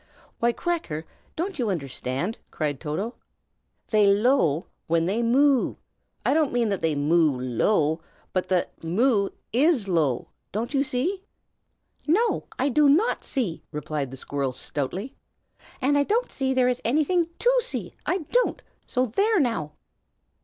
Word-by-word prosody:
"Why, 235 +1 +3
Cracker, 235 - -3 0.3
can't 350 -1 -3
you 235 -4 +1
understand?" 140 - -3
cried 145 -4 -2
Toto. 170 +10 -3 0.7
"They 210 -2 +4
low 200 - +3 0.2
when 165 0 +2
they 205 +6 0
moo! 265 +3 +3 0.5
I - - +3
don't 310 -2 +2
mean 240 -2 +1
that 200 -2 -1
they 160 -2 +1
moo 150 -1 +3
low, 150 - +1 0.3
but 185 - -1 0.3
'moo' 200 +4 +2 0.2
is 265 - +3
'low,' 155 -9 +1 0.2
don't 230 +7 -3
you 275 -1 +3
see?" 305 +9 -1 0.8
"No, 430 +10 +2
I 265 - +1
do 290 +1 +4
not 365 - +3
see!" 220 - -2
replied 150 -2 -3
the 135 - -8
squirrel, 135 -1 -2
stoutly. 150 - -4 0.7
"And 275 +2 +3
I - - +4
don't 455 - 0
believe 265 -1 0
there 255 -1 +4
is 250 0 0
anything 315 +7 +2
to - - +3
see, - - -5
I 360 -3 -1
don't. - - +2 0.3
So 255 0 +1
there, 400 - +2
now!" 200 - 0
230 Hz, 145 wpm, -25 LUFS, -, 0.8 s, They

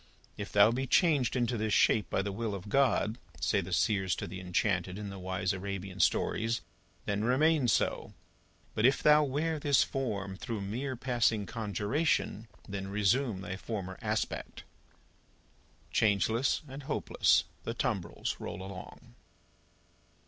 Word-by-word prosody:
"If 100 - -6
thou 105 +2 +6
be 130 +3 -2
changed 140 - +3
into 120 -1 0
this 110 -1 +1
shape 105 -3 +3
by 95 - 0
the 100 - -3
will 105 +1 -3
of 100 +1 -8
God," 125 -3 +2 0.2
say 105 - +1
the 95 0 -8
seers 95 -1 +1
to - - -4
the 90 +3 -7
enchanted, 90 0 0
in 105 -1 -5
the 95 - -8
wise 95 +1 -1
Arabian 95 0 -5
stories, 115 +4 +1 0.4
"then 105 +1 -1
remain 140 +3 +3
so! - - 0 0.6
But, 110 +3 +4
if 135 - +1
thou 150 0 +7
wear 150 +3 -1
this 145 -3 +4
form 100 -8 -3
through 115 -2 -4
mere 125 +7 -3
passing 120 -4 +1
conjuration, 115 - -1 0.2
then 95 -1 -4
resume 105 +2 +1
thy 95 -1 -5
former 95 -3 -5
aspect!" - - -3 1.3
Changeless 110 +6 +2
and 135 +2 -8
hopeless, 135 - +2 0.2
the - - -4
tumbrils - - -2
roll 95 - -6
along. 95 -9 -10
105 Hz, 140 wpm, -31 LUFS, 95-125 Hz, 1.3 s, thou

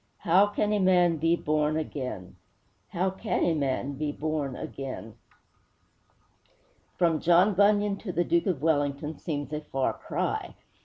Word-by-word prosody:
'How 185 +4 +4
can 210 +1 0
a 210 - +1
man 180 -3 +4
be 165 +2 +2
born 155 -1 0
again? 130 - -5 0.5
How 185 +2 0
can 200 +4 -2
a 170 - +2
man 140 -2 -1
be 145 +2 -3
born 150 -3 -3
again?' 120 -6 -7 1.8
From 165 -3 +2
John 175 +4 +4
Bunyan 205 +1 +3
to 200 - -6
the 175 0 +1
Duke 170 +2 +1
of 160 -7 -1
Wellington 150 -1 0
seems 145 -2 -4
a 150 - -2
far 135 -3 -1
cry. - - -3
160 Hz, 145 wpm, -27 LUFS, 145-185 Hz, 1.8 s, How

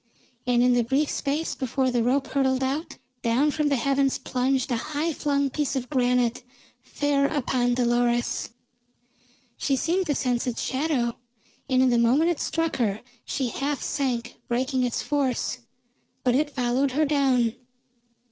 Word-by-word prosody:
And 245 -1 +3
in 250 0 +4
the 245 -1 +3
brief 275 +6 +1
space 290 +3 -1
before 260 0 -1
the 240 -1 +1
rope 260 +4 +1
hurtled 265 -1 +1
out, 280 +5 -3 0.2
down 255 +6 +2
from 300 0 0
the 280 - +2
heavens 275 +1 +1
plunged 260 +1 -1
a - - +2
high 305 +7 -2
flung 280 -2 0
piece 290 0 -1
of 255 0 -3
granite 250 -3 +2 0.4
fair 285 -1 0
upon 250 -4 0
Dolores. 240 -1 +1 1.1
She 275 - +1
seemed 350 +7 0
to 290 - +1
sense 250 -2 0
its 240 - -2
shadow, 260 -4 -1 0.5
and 260 -1 +4
in 255 - +4
the 240 - +3
moment 270 +9 +4
it 335 - -3
struck 330 0 -1
her 215 -5 0 0.2
she 260 -3 -2
half 280 +3 -2
sank, 245 -4 -2
breaking 255 +2 0
its 245 -2 -1
force. 270 -3 -1 0.6
But 250 - +3
it 290 +3 +2
followed 255 0 0
her 305 +3 +2
down. 265 -6 +2
265 Hz, 155 wpm, -25 LUFS, 245-285 Hz, 1.1 s, in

